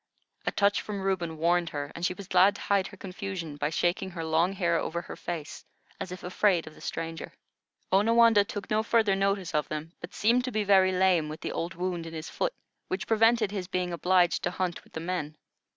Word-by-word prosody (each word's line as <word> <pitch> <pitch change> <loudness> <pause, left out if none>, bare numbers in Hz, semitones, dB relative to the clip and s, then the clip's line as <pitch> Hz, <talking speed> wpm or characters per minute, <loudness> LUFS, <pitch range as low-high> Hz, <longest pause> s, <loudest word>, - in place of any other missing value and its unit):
A - - +3
touch 205 0 +2
from 200 -2 -5
Reuben 175 -4 -1
warned 170 +1 +2
her, 145 -1 -5
and 170 - -8
she 180 - +1
was 200 -2 -9
glad 190 +2 +5
to - - -9
hide 200 -2 +1
her - - -13
confusion 185 -5 -6
by 145 +1 -1
shaking 175 +4 0
her 170 -3 -6
long 165 +4 +2
hair 175 -3 +1
over 170 +1 -3
her - - -8
face, 165 -4 -6 0.4
as 185 - -5
if 180 - -8
afraid 180 -1 +2
of 155 - -10
the - - -16
stranger. 165 0 -5 0.6
Onawandah 225 +1 +5
took 205 -1 -6
no 215 0 +3
further 220 -3 +2
notice 195 -2 0
of 150 -1 +1
them, 155 +1 -5
but 175 - -9
seemed 235 +4 +3
to 255 - -3
be 215 -2 0
very 190 -2 +5
lame 180 -4 +3
with 155 - -7
the - - -3
old 170 +1 -3
wound 175 -1 -3
in 165 - -8
his 160 0 -6
foot, - - -1 0.3
which 190 +2 -3
prevented 225 -1 +3
his 190 -3 -4
being 180 -1 -2
obliged 180 +1 +3
to - - 0
hunt 180 -1 -3
with - - -24
the - - -4
men. 160 -3 -3
185 Hz, 220 wpm, -28 LUFS, 165-200 Hz, 0.6 s, glad